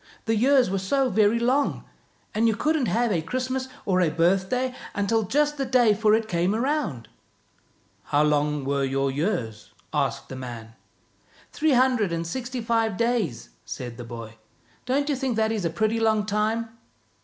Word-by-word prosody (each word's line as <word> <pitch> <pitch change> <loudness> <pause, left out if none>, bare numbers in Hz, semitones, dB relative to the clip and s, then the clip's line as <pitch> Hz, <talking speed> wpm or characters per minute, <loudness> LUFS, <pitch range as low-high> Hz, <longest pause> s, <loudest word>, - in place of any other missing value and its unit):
The 225 - +1
years 255 -1 +4
were 195 - 0
so 260 +8 +1
very 215 +2 +3
long, 255 +5 +1 0.5
and 225 +2 +2
you 220 - +2
couldn't 305 -2 +1
have 235 0 +1
a 170 -5 +1
Christmas 255 +7 -3 0.2
or 185 -2 +2
a 170 - +3
birthday 190 +10 +1 0.2
until 205 +3 +1
just 295 +7 +1
the 270 - 0
day 245 -4 +4
for 215 +1 +3
it 225 0 -1
came 180 +1 0
round." 240 - -1 0.5
" - - -39
How 145 +1 +2
long 150 -1 +1
were 140 0 0
your 135 0 0
years? 130 - -3
" - - -37
asked - - -1
the - - -6
man. 120 -3 -8 0.4
" - - -31
Three 310 -1 +2
hundred 250 -6 +3
and 165 0 -2
sixty 250 +7 -4
five 225 -3 0
days," 230 - -1
said 120 -2 -7
the 120 - -7
boy. 115 -1 -9 0.2
" - - -35
Don't 280 +3 +1
you 290 - +1
think 260 -2 -2
that 220 0 +1
is 210 -5 -2
a - - +1
pretty 220 +6 0
long 220 -2 +2
time? 215 +2 -1
215 Hz, 185 wpm, -25 LUFS, 165-250 Hz, 0.5 s, years